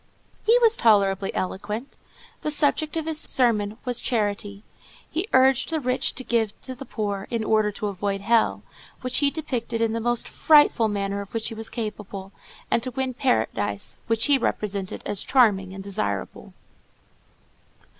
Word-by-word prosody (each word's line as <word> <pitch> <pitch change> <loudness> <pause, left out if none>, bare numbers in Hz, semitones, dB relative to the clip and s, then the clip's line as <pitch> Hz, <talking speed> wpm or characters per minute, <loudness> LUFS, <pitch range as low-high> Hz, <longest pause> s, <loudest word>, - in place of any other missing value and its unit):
He 460 +2 +5
was 460 0 +5
tolerably 200 -4 +3
eloquent. 210 +7 -4 0.5
The - - -2
subject 300 +1 +2
of 320 - -2
his 320 -1 0
sermon 220 -7 +2
was 245 -2 -2
charity. 205 -3 -1 0.4
He 340 +6 -3
urged 260 -1 +4
the 320 -1 0
rich 255 -2 0
to 260 - -5
give 225 -4 0
to 260 - -5
the 255 +2 -9
poor, 205 -2 -3
in 230 -2 -1
order 215 -1 +2
to 210 - -4
avoid 200 0 -2
hell, 230 +2 +2 0.4
which 255 0 +1
he 285 -1 +3
depicted 250 -7 -3
in 225 -1 +1
the 230 - -2
most 240 +1 0
frightful 295 -7 +4
manner 200 -1 -2
of 200 +2 -10
which 225 - -1
he - - -7
was 225 0 -5
capable, 210 -4 -6 0.4
and 230 - +3
to 255 - -4
win 260 0 -2
paradise, 110 - -1
which 225 0 +2
he 285 -2 +4
represented 200 -5 -2
as 200 - -2
charming 205 -8 +3
and 190 0 -8
desirable. 200 +1 -4
225 Hz, 165 wpm, -24 LUFS, 200-260 Hz, 0.5 s, He